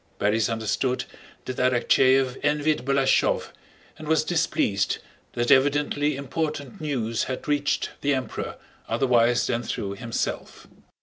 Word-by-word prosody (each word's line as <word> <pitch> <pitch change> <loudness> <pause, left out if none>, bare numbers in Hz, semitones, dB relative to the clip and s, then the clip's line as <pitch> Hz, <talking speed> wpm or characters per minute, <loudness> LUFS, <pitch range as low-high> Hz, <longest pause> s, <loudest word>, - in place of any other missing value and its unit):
(Borís 110 +3 +1
understood 115 +3 -1 0.4
that 130 - -5
Arakchéev 130 +1 +3
envied 150 +1 +1
Balashëv 135 -1 +2 0.5
and 155 - -8
was 160 0 +3
displeased 155 - 0 0.4
that 120 +3 0
evidently 145 +2 +3
important 150 +4 -4
news 120 -7 -1
had 130 - -5
reached 145 0 0
the 145 0 +2
Emperor 130 -1 -4 0.3
otherwise 120 0 +3
than 120 - -1
through 100 -4 -4
himself.) 115 +4 -4
135 Hz, 115 wpm, -25 LUFS, 120-145 Hz, 0.5 s, Arakchéev